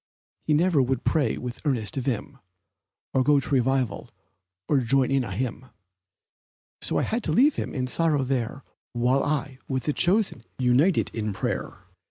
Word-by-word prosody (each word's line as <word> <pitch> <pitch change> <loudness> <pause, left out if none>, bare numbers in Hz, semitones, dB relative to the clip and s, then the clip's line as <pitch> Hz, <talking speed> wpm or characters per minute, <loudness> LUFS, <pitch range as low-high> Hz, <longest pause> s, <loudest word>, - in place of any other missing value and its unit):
He 155 - +1
never 165 -2 +3
would 130 0 -1
pray 145 -8 +1
with 125 -1 -5
an - - -18
earnest 120 -8 -1
vim, 135 +1 -3 0.7
Or 130 - +3
go 145 +1 +4
to - - -6
revival, 130 -5 0 0.6
or 145 - +3
join 130 +2 +2
in 135 -1 +2
a - - -5
hymn, 130 0 -4 1.1
So - - 0
I - - +2
had 230 +1 -2
to 160 - 0
leave 270 - +5
him - - -3
in 130 -2 -1
sorrow 150 +1 +1
there 130 0 -2 0.3
While 125 +3 +2
I, 140 -3 -2
with 130 -2 -2
the 150 - 0
chosen, 185 - +1
united 130 +8 +2
in 110 -2 -2
prayer. 95 - -4
135 Hz, 170 wpm, -25 LUFS, 125-150 Hz, 1.1 s, leave